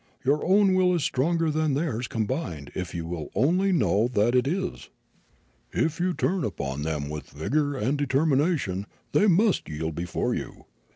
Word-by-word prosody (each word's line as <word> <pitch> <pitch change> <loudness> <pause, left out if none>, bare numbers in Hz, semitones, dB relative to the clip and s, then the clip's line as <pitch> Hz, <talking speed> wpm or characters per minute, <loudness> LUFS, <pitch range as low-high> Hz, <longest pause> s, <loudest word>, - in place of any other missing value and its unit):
Your 145 +3 +2
own 195 +1 +4
will 185 -1 +3
is 165 - 0
stronger 165 +4 +1
than 155 -1 +1
all 150 - 0
theirs 125 -6 -2
combined 110 - -3
if 90 -2 -5
you 85 -1 -3
will 80 -3 -5
only 175 - +3
know 105 - +2
that 120 -1 +1
it 125 +1 +3
is; 185 +4 -3 0.8
if 160 +1 0
you 180 0 0
turn 185 -1 0
upon 70 -8 -3
them 75 -2 -2
with 75 0 -6
vigor 145 - -1
and 130 +5 0
determination 140 - +1 0.2
they 210 - +4
must 200 +3 +3
yield 80 +1 -3
before 85 +3 -2
you. - - -6
135 Hz, 170 wpm, -26 LUFS, -, 0.8 s, own